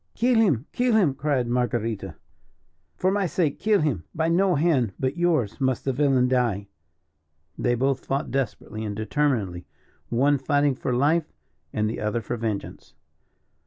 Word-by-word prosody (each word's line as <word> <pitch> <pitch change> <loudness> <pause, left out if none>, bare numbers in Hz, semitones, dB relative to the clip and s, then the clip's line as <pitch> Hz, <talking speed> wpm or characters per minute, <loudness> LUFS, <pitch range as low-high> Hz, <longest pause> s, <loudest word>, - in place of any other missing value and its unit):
"Kill 245 +2 +2
him! 150 - +2
Kill 245 -2 +1
him!" 180 -11 +4
cried 135 -3 0
Marguerita. 120 -3 -1 0.8
"For 185 - +1
my 200 -1 +1
sake 160 -4 -1
kill 215 -3 +3
him! 130 - 0
By 160 +1 +1
no 180 +2 +3
hand 140 - +2
but 130 +1 -1
yours 160 - 0
must 130 -1 0
the 135 - +1
villain 135 -2 +3
die!" 115 -6 0 0.9
They 120 -1 +1
both 135 +2 0
fought 135 +2 -2
desperately 115 -4 -3
and 105 -2 -4
determinedly, 110 - -1 0.4
one 140 +4 +2
fighting 145 +1 +2
for 130 - -3
life, 150 +6 +1 0.4
and 105 0 0
the 110 - -3
other 105 +2 -1
for 115 +2 -4
vengeance. 110 -3 -5
135 Hz, 155 wpm, -25 LUFS, 115-155 Hz, 0.9 s, him